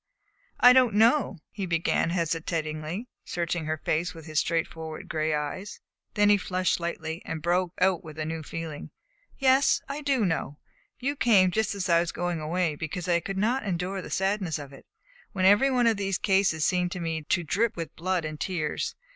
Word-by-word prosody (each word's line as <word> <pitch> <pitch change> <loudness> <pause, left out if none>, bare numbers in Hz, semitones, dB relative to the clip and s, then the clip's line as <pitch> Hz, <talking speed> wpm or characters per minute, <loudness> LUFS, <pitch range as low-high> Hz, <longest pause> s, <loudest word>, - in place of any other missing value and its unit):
"I 250 0 +9
don't 250 -5 +4
know," 230 -1 +4
he 195 -3 -4
began 165 0 +1
hesitatingly, 165 +2 -2 0.2
searching 170 -1 -2
her 155 0 -1
face 165 +4 -1
with 160 -2 -11
his 155 -2 0
straightforward 160 -1 -3
gray 155 0 -1
eyes. 150 +7 -4 0.4
Then 205 -1 +4
he 205 - +6
flushed 185 -1 0
slightly, 165 -1 -3
and 160 - -4
broke 175 +2 0
out 185 -2 +2
with 155 -1 -10
new 160 +1 -3
feeling: 160 -1 -6 0.5
"Yes; 270 0 +4
I 280 +2 -4
do 275 -6 +1
know. 160 -5 -2 0.4
You 275 +3 -1
came 200 -9 +4
just 220 +1 0
as 195 -1 -2
I 170 -1 +5
was 170 0 -1
going 175 -2 -2
away 165 +1 0
because 160 +4 -5
I 170 -1 +3
could 195 +3 -5
not 235 +7 +1
endure 185 0 -2
the - - -9
sadness 190 -3 0
of 140 -2 -9
it; 135 - -15 0.5
when 185 -3 0
every 205 +8 +6
one 250 -2 +2
of 225 -2 +3
these 195 -2 -1
cases 190 -6 +2
seemed 180 -1 +1
to 180 - -5
me 165 -2 -2
to 175 +3 0
drip 205 +8 0
with 165 -1 -5
blood 180 0 -1
and 155 -1 -5
tears. 165 -4 -2
175 Hz, 190 wpm, -27 LUFS, 160-200 Hz, 0.5 s, I